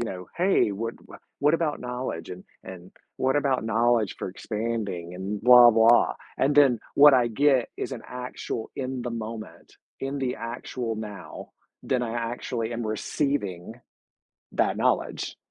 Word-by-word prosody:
you -, -, -1 dB
know, 90 Hz, -5 st, -6 dB
"Hey, 180 Hz, -, +3 dB
what 115 Hz, +3 st, -4 dB, 0.4 s
what 150 Hz, +2 st, +3 dB
about 165 Hz, -3 st, -1 dB
knowledge 125 Hz, -10 st, -5 dB
and 90 Hz, 0 st, -8 dB, 0.2 s
and 90 Hz, 0 st, -10 dB, 0.3 s
what 130 Hz, +1 st, +1 dB
about 135 Hz, -5 st, +1 dB
knowledge 115 Hz, -2 st, +1 dB
for -, -, -4 dB
expanding 100 Hz, -4 st, -4 dB
and 100 Hz, +3 st, -4 dB
blah 125 Hz, 0 st, +9 dB
blah." 115 Hz, +1 st, +5 dB, 0.2 s
And 140 Hz, +2 st, +1 dB
then 135 Hz, -6 st, +5 dB, 0.2 s
what 145 Hz, 0 st, +8 dB
I 120 Hz, -2 st, +3 dB
get 135 Hz, +1 st, +2 dB
is -, -, -4 dB
an 120 Hz, -, -6 dB
actual 125 Hz, -2 st, -6 dB
in 130 Hz, -1 st, -4 dB
the 120 Hz, -, -4 dB
moment, 110 Hz, -1 st, -8 dB, 0.2 s
in 135 Hz, +1 st, -3 dB
the 130 Hz, -2 st, -1 dB
actual 115 Hz, 0 st, -5 dB
now, 105 Hz, -2 st, -8 dB, 0.3 s
then 125 Hz, -2 st, 0 dB
I 115 Hz, -1 st, -3 dB
actually 115 Hz, -1 st, -3 dB
am 115 Hz, 0 st, -3 dB
receiving 110 Hz, -, -2 dB, 0.8 s
that -, -, +1 dB
knowledge. -, -, -1 dB
115 Hz, 150 wpm, -26 LUFS, 110-130 Hz, 0.8 s, blah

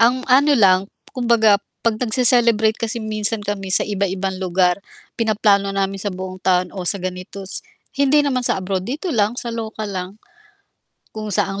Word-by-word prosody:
Ang 250 Hz, +3 st, +3 dB
ano 280 Hz, +3 st, +4 dB
lang, 190 Hz, -5 st, +5 dB, 0.3 s
kumbaga 230 Hz, -5 st, +3 dB, 0.2 s
'pag 225 Hz, -2 st, +1 dB
nagse-celebrate 235 Hz, -2 st, +3 dB
kasi 230 Hz, -1 st, -3 dB
minsan 215 Hz, 0 st, -1 dB
kami 200 Hz, -1 st, -4 dB
sa 185 Hz, -, +3 dB
iba-ibang 195 Hz, -2 st, -2 dB
lugar, 180 Hz, 0 st, +1 dB, 0.3 s
pinaplano 210 Hz, -3 st, +2 dB
namin 195 Hz, 0 st, -1 dB
sa 205 Hz, -, -2 dB
buong 185 Hz, 0 st, -7 dB
taon 180 Hz, -1 st, +1 dB
o 185 Hz, -3 st, -3 dB
sa -, -, +3 dB
ganito 185 Hz, +1 st, -6 dB, 0.6 s
hindi 290 Hz, +1 st, +4 dB
naman 265 Hz, -3 st, 0 dB
sa 245 Hz, -, 0 dB
abroad 190 Hz, 0 st, -3 dB
dito 310 Hz, +7 st, -3 dB
lang 220 Hz, -1 st, +1 dB
sa 235 Hz, -1 st, -4 dB
lokal 220 Hz, -2 st, -5 dB
lang. 185 Hz, -1 st, -4 dB, 1.0 s
Kung 215 Hz, -1 st, -5 dB
saan 195 Hz, +1 st, 0 dB
210 Hz, 160 wpm, -20 LUFS, 190-235 Hz, 1.0 s, lang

